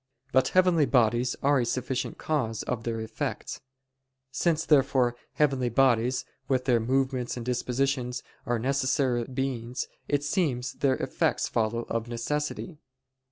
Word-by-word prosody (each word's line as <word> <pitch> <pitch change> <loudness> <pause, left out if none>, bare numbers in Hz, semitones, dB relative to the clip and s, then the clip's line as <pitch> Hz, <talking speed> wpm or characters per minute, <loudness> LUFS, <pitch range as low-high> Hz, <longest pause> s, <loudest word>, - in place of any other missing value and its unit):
But 130 - +4
heavenly 180 -5 +4
bodies 120 0 +2
are 140 0 +4
a - - +2
sufficient 130 +1 -2
cause 125 -8 -1
of 120 -2 -3
their 115 -1 -2
effects. 110 0 -4 0.7
Since, 160 +2 +1
therefore, 135 -4 +3 0.2
heavenly 135 -4 +2
bodies, 125 0 +2 0.2
with 130 -1 +1
their 125 -3 +4
movements 130 +1 0
and 120 - -5
dispositions, 125 0 -1 0.2
are 120 0 +1
necessary 130 -1 +1
beings; 125 -1 -3 0.2
it 145 -1 +1
seems 145 -7 0
that - - -21
their 135 -2 +3
effects - - 0
follow 115 +1 0
of 115 0 -3
necessity. 150 +7 -3
130 Hz, 135 wpm, -27 LUFS, 120-140 Hz, 0.7 s, But